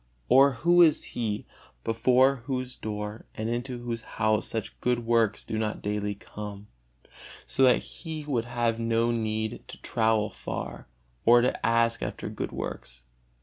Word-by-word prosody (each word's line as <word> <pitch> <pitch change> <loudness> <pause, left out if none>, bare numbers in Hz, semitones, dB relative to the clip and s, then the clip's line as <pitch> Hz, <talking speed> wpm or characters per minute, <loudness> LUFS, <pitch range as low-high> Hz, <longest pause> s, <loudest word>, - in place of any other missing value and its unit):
Or 135 +1 +7
who 175 +8 +4
is 160 -3 +5
he, 110 -3 -2 0.4
before 125 +4 +4
whose 130 -1 -3
door 105 0 -5
and 110 - -3
into 120 +1 -3
whose 120 -1 -3 0.2
house 110 -1 +2
such 110 -2 -5
good 120 -1 +1
works 115 -3 +2
do 110 - -3
not 110 -1 -2
daily 105 0 -1
come, 105 0 -8 0.8
so - - -2
that 125 - +6
he 160 -3 -7
would 125 -6 0
have 120 -1 0
no 115 0 +2
need 110 -1 -2
to - - -10
travel 110 -2 +1
far - - -6 0.4
or 120 +1 +7
to 125 - 0
ask 115 0 +2
after - - -4
good - - -4
works? 60 0 -6
115 Hz, 150 wpm, -28 LUFS, 110-125 Hz, 0.8 s, Or